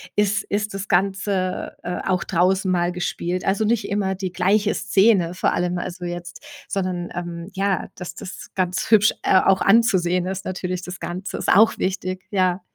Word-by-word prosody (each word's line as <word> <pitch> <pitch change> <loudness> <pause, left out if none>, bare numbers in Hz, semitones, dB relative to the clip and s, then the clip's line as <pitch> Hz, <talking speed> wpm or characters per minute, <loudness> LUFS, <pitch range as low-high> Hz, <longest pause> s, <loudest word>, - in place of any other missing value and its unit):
ist 205 0 +2
ist 205 0 -2
das 195 +1 -4
Ganze, 190 0 0
äh, 180 0 -4
auch 185 -2 +1
draußen 185 +2 +1
mal 175 -1 +1
gespielt. 180 0 -3
Also, 200 +3 +1
nicht 230 +1 0
immer 200 -1 0
die 190 -1 -4
gleiche 200 +4 +2
Szene, 195 -3 +3
vor 180 - 0
allem 175 0 -1
also, 175 0 -5
jetzt, 175 +6 -7 0.2
sondern, 185 -2 -2
ähm, 170 0 -5
ja, 195 -2 0
dass 180 -1 -7
das 180 - -9
ganz 185 +3 -1
hübsch, 215 -1 +6
äh, 190 - +5
auch 190 0 +3
anzusehen 185 -5 +3
ist 190 0 -4
natürlich 185 -1 -3
das 180 +1 -7
Ganze. 185 +3 -5
Ist - - -2
auch 220 +4 +5
wichtig, 185 -1 -2
ja. 185 -2 +1
185 Hz, 175 wpm, -22 LUFS, 180-195 Hz, 0.2 s, hübsch